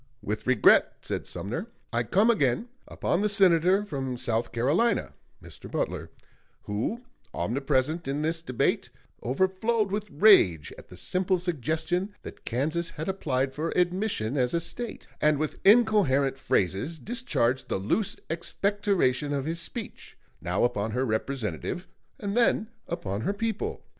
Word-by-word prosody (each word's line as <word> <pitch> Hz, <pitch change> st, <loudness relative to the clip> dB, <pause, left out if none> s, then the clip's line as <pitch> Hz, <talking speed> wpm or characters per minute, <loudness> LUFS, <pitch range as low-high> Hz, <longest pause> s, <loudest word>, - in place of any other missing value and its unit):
With 105 Hz, +3 st, -4 dB
regret 130 Hz, -4 st, +5 dB
[said -, -, -3 dB
Sumner], 160 Hz, -, -4 dB, 0.3 s
I 120 Hz, -, +2 dB
come 200 Hz, -, +3 dB
again 170 Hz, -, +1 dB, 0.2 s
upon 180 Hz, -, -1 dB
the 210 Hz, -, +2 dB
Senator 190 Hz, 0 st, +4 dB
from 135 Hz, -8 st, -3 dB
South 120 Hz, -2 st, -1 dB
Carolina 150 Hz, -, +1 dB, 0.3 s
[Mr. -, -, -11 dB
Butler], -, -, -2 dB, 0.5 s
who, 115 Hz, -, -3 dB, 0.3 s
omnipresent 135 Hz, -, 0 dB
in 140 Hz, +2 st, -1 dB
this 165 Hz, +1 st, -1 dB
debate, 130 Hz, -7 st, 0 dB, 0.3 s
overflowed 190 Hz, -, +1 dB
with 210 Hz, 0 st, -2 dB
rage 145 Hz, -, +5 dB
at -, -, -14 dB
the 90 Hz, -, -12 dB
simple 185 Hz, -, +1 dB
suggestion 175 Hz, -, -2 dB
that -, -, -10 dB
Kansas 155 Hz, +8 st, -1 dB
had 155 Hz, -, -6 dB
applied 135 Hz, -8 st, -1 dB
for 155 Hz, +4 st, -2 dB
admission 180 Hz, -, 0 dB
as 125 Hz, +3 st, +1 dB
a -, -, +2 dB
State; 230 Hz, +7 st, -5 dB, 0.2 s
and 150 Hz, -1 st, +4 dB
with 155 Hz, +1 st, -3 dB
incoherent 195 Hz, -, +4 dB
phrases 100 Hz, -, 0 dB
discharged 140 Hz, -, -1 dB
the -, -, 0 dB
loose 110 Hz, -, 0 dB
expectoration 170 Hz, -5 st, 0 dB
of 140 Hz, -1 st, -1 dB
his 165 Hz, +2 st, -2 dB
speech, 225 Hz, +6 st, -7 dB, 0.2 s
now 90 Hz, +3 st, 0 dB
upon 110 Hz, -3 st, 0 dB
her 130 Hz, +2 st, 0 dB
representative 115 Hz, -, -3 dB, 0.3 s
and 200 Hz, 0 st, -3 dB
then 235 Hz, -2 st, +2 dB, 0.2 s
upon 100 Hz, -, -3 dB
her 200 Hz, -, 0 dB
people. 220 Hz, 0 st, -3 dB
160 Hz, 140 wpm, -27 LUFS, 125-195 Hz, 0.5 s, regret